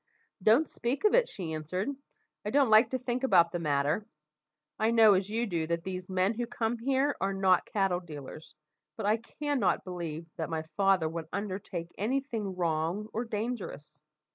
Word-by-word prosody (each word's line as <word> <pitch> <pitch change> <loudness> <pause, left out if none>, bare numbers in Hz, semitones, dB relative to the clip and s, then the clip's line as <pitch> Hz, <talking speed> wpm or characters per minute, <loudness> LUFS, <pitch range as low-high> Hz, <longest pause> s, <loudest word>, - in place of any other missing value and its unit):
"Don't 230 +11 +5
speak 250 - -3
of 425 - +4
it," - - +4
she 170 -5 -5
answered; 160 +6 -3 0.6
"I 210 - -2
don't 270 -1 +3
like 215 +3 +7
to 260 - -1
think 250 0 -3
about 175 -9 +5
the 175 - -2
matter. 150 +4 +1 0.8
I 220 - +3
know, 225 -2 +7
as 190 +1 0
you 230 +3 0
do, 170 -6 -2
that 170 0 -1
these 185 -1 -5
men 185 +3 +2
who 240 +1 -3
come 235 -1 -2
here 270 +3 +1
are 195 0 0
not 190 -2 +3
cattle 195 -3 +1
dealers, 155 -2 -10 0.4
but 220 - -3
I 210 +2 +3
cannot 250 - -1
believe 170 -3 -5
that 160 - -3
my 160 -1 -2
father 195 -4 +3
would 165 0 -5
undertake 185 -4 -4
any 245 +7 +1
thing 220 -8 -4
wrong 170 +4 -1
or 230 +2 -2
dangerous. 210 - -5
195 Hz, 180 wpm, -30 LUFS, 170-230 Hz, 0.8 s, like